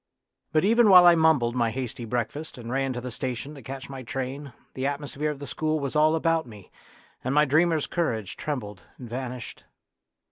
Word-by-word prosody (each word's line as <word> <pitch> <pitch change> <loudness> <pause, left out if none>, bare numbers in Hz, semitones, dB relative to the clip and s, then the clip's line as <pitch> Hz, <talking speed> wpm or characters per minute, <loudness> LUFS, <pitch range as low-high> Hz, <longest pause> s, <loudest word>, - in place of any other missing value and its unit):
But 155 +2 +2
even 230 +1 +5
while 180 -2 +9
I 175 - +9
mumbled 160 -8 +3
my 120 -2 +2
hasty 125 0 -5
breakfast 125 +7 -3
and 120 -1 -7
ran 135 0 0
to 120 - -5
the 125 0 -6
station 130 +4 -4
to 140 - -11
catch 130 +2 -7
my 135 -1 -7
train 135 +3 -5 0.2
the 130 +1 -2
atmosphere 145 +1 -3
of 150 - -4
the 140 - -7
school 155 +2 -1
was 140 -1 -4
all 155 +1 +4
about 165 -1 +1
me, 105 -5 -13 0.5
and 130 +3 -1
my 150 0 +5
dreamer's 155 +2 +2
courage 115 - -2
trembled 105 - -5 0.2
and 125 - -9
vanished. 125 0 -6
135 Hz, 190 wpm, -26 LUFS, 125-155 Hz, 0.5 s, while